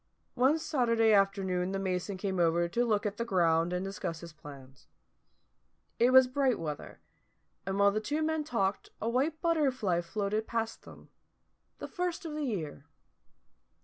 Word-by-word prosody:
One 265 +5 +3
Saturday 230 -8 +2
afternoon 195 -2 +1
the - - -1
mason 190 0 -2
came 190 -1 -2
over 170 0 +2
to 235 +8 0
look 210 -3 +1
at 205 0 -2
the 235 - -1
ground 170 -5 +2
and 180 +1 -2
discuss 170 -4 -5
plans. 140 -2 -13 1.1
It 240 - +5
was 260 0 +8
bright 255 -1 +1
weather, 150 -3 -6 0.7
and 195 0 -1
while 200 0 +5
the 215 - -1
two 295 +8 -1
men 315 0 0
talked 200 -9 -1
a 220 - -3
white 275 +7 0
butterfly 260 - +1
floated 205 +5 -2
past 225 -1 -3
them - - -14 0.7
the - - -6
first 355 -1 -3
of 315 - -5
the 300 -1 -2
year. 160 - -4
205 Hz, 155 wpm, -30 LUFS, 180-255 Hz, 1.1 s, was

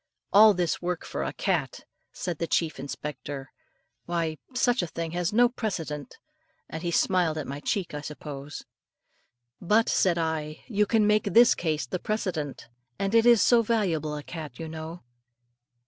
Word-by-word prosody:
"All 210 0 +8
this 175 -2 -1
work 175 -1 -3
for - - -4
a - - -2
cat!" - - -1 0.3
said 175 -4 -4
the 170 - -1
chief 160 -3 0
inspector. 140 -1 -6 0.6
"Why, 165 -2 -1 0.2
such 245 -2 +2
a 175 - -2
thing 165 0 -5
has 175 +2 -1
no 240 +3 +5
precedent;" 170 - -4 0.5
and 160 - -6
he 175 - -2
smiled 170 -2 +2
at 155 - -3
my 140 +1 -5
cheek, 180 +4 -2
I 150 - -4
suppose. 145 -1 -8 1.0
"But," 215 +5 +3
said 180 -3 +2
I, 160 -2 -2
"you 210 -4 +1
can 220 -1 +3
make 210 0 +3
this 230 +4 +6
case 155 -5 -1
the 180 +9 -4
precedent; 175 - -3 0.3
and 195 +1 -1
it 230 +1 +5
is 235 -3 +7
so 240 -1 +5
valuable 180 -10 0
a 150 - -6
cat, 155 -7 -8
you 165 - -6
know." 160 +2 -7
170 Hz, 165 wpm, -27 LUFS, 155-210 Hz, 1.0 s, All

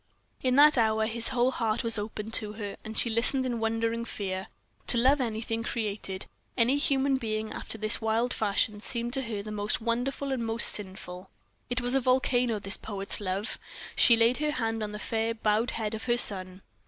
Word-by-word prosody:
In 255 -1 0
that 290 -1 +6
hour 220 -1 +1
his 230 +1 -2
whole 255 -1 +1
heart 225 -3 -2
was 230 -2 +3
opened 215 +1 -7
to 210 -2 +1
her, 205 -2 -7
and 220 0 -8
she - - +2
listened 235 +4 +4
in 240 -2 -3
wondering 225 +1 -2
fear. 190 -4 -5 0.4
To 240 - +4
love 265 +4 +3
anything 225 -1 -3
created, 210 -5 -4 0.3
any 250 +3 +2
human 275 -2 +1
being 220 -2 -4
after - - -7
this 215 +2 +1
wild 225 +2 0
fashion, 210 0 -1
seemed 235 +1 -4
to 270 - 0
her 220 -5 -5
most 210 0 -1
wonderful 245 +4 -3
and 255 -3 -2
most 225 0 +7
sinful. 190 -2 -2 0.4
It 245 +1 -2
was 245 +1 -1
a 270 - +3
volcano, 250 -2 +1
this 195 -1 -2
poet's 200 -1 0
love. 195 +3 -4 0.4
She 235 - +5
laid 230 +2 +2
her 300 0 -1
hand 225 -3 -3
on 210 -1 -4
the 210 - -7
fair, 225 +1 -2
bowed 220 +1 0
head 220 -1 -4
of 220 - -6
her 240 -1 +1
son. 185 -4 +5
225 Hz, 190 wpm, -27 LUFS, 210-245 Hz, 0.4 s, most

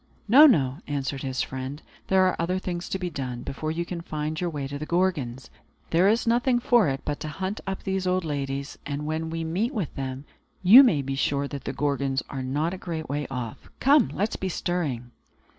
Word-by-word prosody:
"No, 280 +8 +9
no," 140 - +2
answered 140 -1 -2
his 130 -2 -1
friend. 130 +2 -5 0.3
"There 190 0 +4
are 185 - +2
other 175 +3 0
things 175 -1 -4
to - - -1
be 180 -2 -4
done, 125 -4 -4
before 155 +3 -4
you 170 +2 -2
can 170 -1 -5
find 155 0 -4
your 175 - 0
way 145 -4 -4
to 140 +1 -6
the 155 - -5
Gorgons. 150 -9 -1 0.4
There 180 +4 +5
is 230 +4 +2
nothing 240 +2 +3
for 240 - +4
it 135 0 -2
but 145 -1 -2
to - - -5
hunt 190 +6 -4
up 195 0 -4
these 190 -1 -1
old 180 -1 +1
ladies; 140 -1 -3
and 145 +1 -4
when 160 +1 -2
we 165 0 -3
meet 195 - -1
with 190 -9 -2
them, 135 +1 -5 0.4
you 215 +9 +10
may 170 - +3
be 135 +1 -3
sure 140 +1 0
that 140 -2 -7
the - - -2
Gorgons 140 -2 0
are 135 - -4
not 145 +7 -1
a 190 - -6
great 160 -4 -5
way 145 +1 -2
off. 125 -4 -6
Come, 275 -2 +5
let 205 +3 +1
us - - -5
be 190 - -2
stirring!" 150 -10 -2
155 Hz, 220 wpm, -26 LUFS, 140-185 Hz, 0.4 s, you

